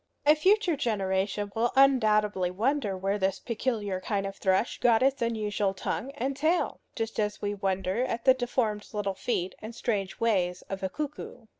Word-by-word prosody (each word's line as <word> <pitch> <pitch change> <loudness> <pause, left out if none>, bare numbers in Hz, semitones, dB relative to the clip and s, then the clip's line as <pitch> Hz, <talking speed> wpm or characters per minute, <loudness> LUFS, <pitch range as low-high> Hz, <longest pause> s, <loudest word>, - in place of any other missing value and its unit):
A 300 - +8
future 370 +3 +3
generation 200 -3 -1
will 235 +2 +1
undoubtedly 215 -8 +4
wonder 215 +1 0
where 195 +2 -1
this 190 0 +1
peculiar 215 -5 -2
kind 195 0 -1
of 195 0 -5
thrush 190 +4 +1
got 235 -1 +4
his 270 0 +2
unusual 210 -4 0
tongue 230 +6 -3
and 270 0 -2
tail, 315 +5 0
just 225 -1 -3
as 210 -1 -1
we 205 0 -2
wonder 195 +2 -1
at 235 -2 -4
the 260 - +8
deformed 240 -4 -1
little 205 -2 -1
feet 190 -1 -2
and 220 +2 -8
strange 200 -5 -2
ways 185 -6 +1
of 195 0 -6
a 190 - -1
cuckoo. 295 -1 -6
215 Hz, 170 wpm, -28 LUFS, 195-250 Hz, -, A